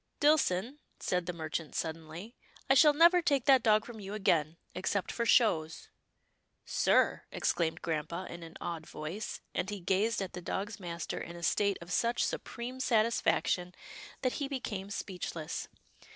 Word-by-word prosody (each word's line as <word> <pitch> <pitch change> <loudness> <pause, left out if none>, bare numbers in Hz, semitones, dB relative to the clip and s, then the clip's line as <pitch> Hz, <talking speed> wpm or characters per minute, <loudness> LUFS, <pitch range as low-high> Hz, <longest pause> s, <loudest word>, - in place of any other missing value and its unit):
" - - -47
Dillson/' 280 -4 +2 0.2
said 180 -1 -1
the - - 0
merchant, 160 -2 -4
suddenly, 165 +7 -5 0.2
" - - -25
I - - +9
shall 295 +2 +7
never 340 +3 +7
take 280 -7 +1
that 265 -2 +6
dog 215 -1 +4
from 235 -2 -9
you 200 +1 -6
again, 165 -6 +1 0.2
except 190 +1 -1
for 235 -1 -1
shows." 165 -11 +3 0.4
" - - -46 0.2
Sir," - - +2
exclaimed 165 0 0
grampa 170 +3 -2
in 170 - -8
an 165 0 -10
awed 165 -2 -5
voice, 165 +8 -5
and 185 - -1
he 205 -1 -4
gazed 195 +5 +1
at 195 -2 -4
the 180 - -6
dog's 200 +4 -4
master 170 -2 -4
in 170 - -7
a 170 - -9
state 200 +3 +2
of 170 +1 -9
such 235 +1 +2
supreme 250 +2 -5
satisfaction 215 -6 +1 0.5
that 255 - +1
he 280 - 0
became 210 -8 -4
speechless. 180 -5 -4
195 Hz, 165 wpm, -32 LUFS, 170-235 Hz, 0.5 s, I